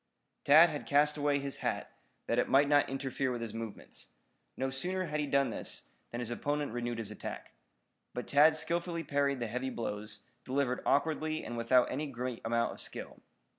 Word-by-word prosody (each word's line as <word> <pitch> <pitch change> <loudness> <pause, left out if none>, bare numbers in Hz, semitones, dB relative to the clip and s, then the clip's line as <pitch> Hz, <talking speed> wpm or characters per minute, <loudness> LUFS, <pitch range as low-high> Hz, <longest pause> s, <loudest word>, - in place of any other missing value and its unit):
Tad 155 +4 +8
had 145 - -5
cast 150 +1 +4
away 145 -1 +2
his 140 -1 -3
hat, - - -2 0.3
that 115 - +1
it - - +1
might 140 +2 +5
not 145 0 +4
interfere 135 -1 -2
with 120 - -3
his 115 -2 -4
movements. 115 -2 -7 0.5
No 135 0 -1
sooner 180 +8 -2
had 150 -3 -2
he 150 - 0
done 140 -3 +2
so - - -3 0.3
than 120 - -4
his 120 -1 -3
opponent 145 +3 -1
renewed 120 -1 -2
his 115 -3 -4
attack. - - -7 0.6
But 125 - -3
Tad 150 +3 +6
skillfully 170 +1 -1
parried 140 -2 +1
the 120 - -1
heavy 125 +4 -2
blows, 105 -3 -4 0.2
delivered 130 -1 0
awkwardly 155 +2 +1
and 120 - -5
without 120 +2 +3
any 150 +2 -2
great 125 -2 -4
amount 115 +1 +1
of - - -9
skill. - - -5
135 Hz, 185 wpm, -32 LUFS, 120-145 Hz, 0.6 s, Tad